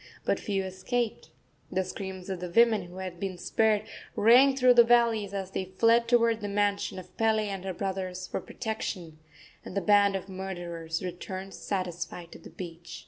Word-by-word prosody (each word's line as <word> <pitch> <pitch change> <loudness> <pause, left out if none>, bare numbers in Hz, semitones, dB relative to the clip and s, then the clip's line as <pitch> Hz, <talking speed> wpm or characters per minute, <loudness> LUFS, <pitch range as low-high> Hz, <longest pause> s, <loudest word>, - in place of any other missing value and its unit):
But - - +1
few 195 -2 -1
escaped. 215 +5 -3 0.4
The 190 +1 +1
screams 190 0 -7
of 185 - -3
the 180 0 -5
women, 220 0 +4
who 175 +1 -12
had 185 -2 -6
been 190 -1 -3
spared, 215 +2 +2 0.3
rang 255 +5 +6
through 255 -1 +6
the 240 -1 +8
valleys 230 -4 +3
as 195 -1 -4
they 190 - -2
fled 230 +1 +4
toward 230 -2 +3
the 205 - -3
mansion 205 -1 0
of 185 - -10
Pele 220 -1 +2
and 195 -2 -4
her 190 - -2
brothers 185 -1 -3
for - - -4
protection, 190 -8 -5 0.4
and 190 - -6
the - - +4
band 200 0 +4
of 195 0 -4
murderers 175 -4 -5
returned 185 +2 -6
satisfied 180 -2 -4
to - - -11
the - - -12
beach. 170 -2 -8
195 Hz, 180 wpm, -28 LUFS, 185-220 Hz, 0.4 s, the